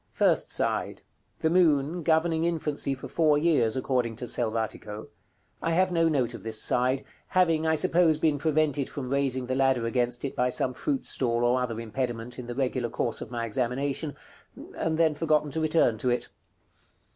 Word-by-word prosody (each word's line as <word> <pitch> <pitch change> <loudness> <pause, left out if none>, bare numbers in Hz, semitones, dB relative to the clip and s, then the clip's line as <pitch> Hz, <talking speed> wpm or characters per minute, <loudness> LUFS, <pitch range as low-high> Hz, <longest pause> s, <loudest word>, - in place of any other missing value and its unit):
First - - +1
side. - - -1 0.4
The 160 - +2
moon, 165 -2 +3
governing 160 0 +2
infancy 150 -4 -1
for 130 - -9
four 155 -3 +3
years, 145 -8 +2
according 125 -3 -1
to 125 - -5
Selvatico. 110 -2 -3 0.5
I 165 - 0
have 185 +2 +2
no 165 -1 +3
note 130 -6 0
of - - -8
this 110 -1 -1
side, 130 +4 +1 0.2
having, 165 -4 +2
I 160 - +3
suppose, 170 -1 +3
been 155 -2 +1
prevented 150 -2 +1
from 130 -3 -6
raising 135 -2 0
the 130 - -2
ladder 130 -3 +2
against 120 +1 -1
it 135 - -4
by 125 0 +1
some 125 +1 0
fruit 275 - -2
stall 120 -2 0
or 125 +1 +2
other 115 -3 -3
impediment 120 +1 -4
in 125 - -7
the 120 - -5
regular 130 -2 -1
course 115 - -2
of - - -6
my 120 -1 -3
examination; 135 +6 -2 0.6
and 160 -1 -1
then 160 -2 +3
forgotten 150 -1 +1
to 160 - -2
return 155 -8 +2
to 125 - 0
it. 120 - -1
135 Hz, 180 wpm, -27 LUFS, 120-160 Hz, 0.6 s, moon